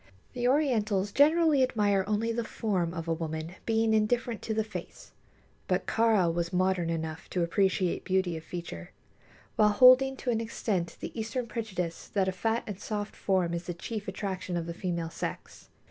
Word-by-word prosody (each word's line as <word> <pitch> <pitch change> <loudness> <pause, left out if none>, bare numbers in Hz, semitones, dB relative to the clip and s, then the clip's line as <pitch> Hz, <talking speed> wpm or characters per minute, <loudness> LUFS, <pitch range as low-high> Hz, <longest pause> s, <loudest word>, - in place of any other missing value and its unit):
The 245 0 0
Orientals 220 -8 +2
generally 310 +1 +4
admire 205 -6 +2
only 215 +2 0
the 235 +1 -1
form 190 -7 -1
of 165 -1 -5
a 165 - +1
woman, 160 0 -4
being 225 0 +2
indifferent 230 +2 +1
to 220 - -2
the 220 - +1
face; 215 - -9 0.6
but - - 0
Kāra 215 -7 +3
was 170 0 -2
modern 185 -2 +1
enough 160 -1 -4
to 180 - 0
appreciate 185 +1 +1
beauty 185 -2 0
of 160 - -7
feature, 160 - -7 0.6
while 210 -1 +6
holding 255 +4 +6
to 250 - -1
an 225 -1 0
extent 205 -6 -2
the - - -5
Eastern 230 +3 -2
prejudice 190 -7 -4
that 195 -2 0
a - - +2
fat 225 +5 -1
and 200 -3 -6
soft 210 -1 -4
form 185 -3 0
is 170 0 -3
the 175 - -4
chief 210 +4 -5
attraction 190 -2 -3
of 170 - -2
the 170 - -5
female 170 -2 -3
sex. - - -6
200 Hz, 175 wpm, -29 LUFS, 175-225 Hz, 0.6 s, while